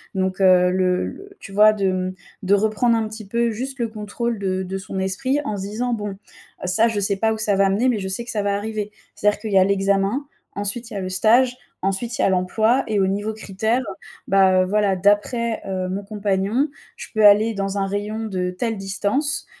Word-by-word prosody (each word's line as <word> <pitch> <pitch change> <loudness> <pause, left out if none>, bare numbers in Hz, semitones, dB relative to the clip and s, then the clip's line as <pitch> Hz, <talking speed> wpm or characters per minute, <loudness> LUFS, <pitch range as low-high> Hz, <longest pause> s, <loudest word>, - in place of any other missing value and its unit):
Donc, 190 0 -1
heu, 180 -1 +5
le 185 0 +1
le 400 - -11
tu - - -11
vois, 210 +2 +6
de 200 -2 -2
m 185 0 -2 0.3
de 190 +1 +2
reprendre 220 +3 +2
un 225 -1 0
petit 215 -1 -9
peu 235 +3 0
juste 260 +5 -5
le 235 - 0
contrôle 220 +1 -4
de 190 -1 -1
de 190 +1 -4
son 190 0 -6
esprit 255 +9 0
en 215 - -2
se - - -5
disant 240 +4 -2
bon: 205 -3 -4 0.5
«Ça 220 +6 +3
je 225 -2 -1
sais 200 0 +1
pas 220 +2 +1
où 220 - -4
ça 215 -2 +1
va 195 0 +3
amener, 205 +7 +1
mais 230 -4 0
je 190 - -4
sais 190 +5 -2
que 240 - -3
ça 210 - -1
va 200 0 0
arriver». 210 0 -4 0.2
C'est-à-dire 210 0 +1
qu'il 215 0 -5
y - - +5
a - - +6
l'examen, 200 +6 +1 0.3
ensuite 205 +4 -3
il - - -7
y - - -2
a - - -3
le 185 - -4
stage, 235 +7 +3 0.3
ensuite 195 +5 -2
il - - +2
y - - +3
a - - +3
l'emploi 220 +7 +2
et 215 -2 0
au 190 - +3
niveau 205 +3 -2
critère, 220 +3 -1 0.5
bah, 190 -1 +4
heu, - - -1
voilà, 205 0 +1
d'après, 210 +4 +1
heu, 185 -1 -3
mon 195 +2 -3
compagnon, 205 +5 0 0.3
je - - -8
peux 215 -1 +3
aller 210 +2 +6
dans 195 -1 -3
un 195 -1 0
rayon 210 +3 -3
de 185 -4 -2
telle 225 +5 -2
distance. 200 +9 0
205 Hz, 230 wpm, -21 LUFS, 195-225 Hz, 0.5 s, vois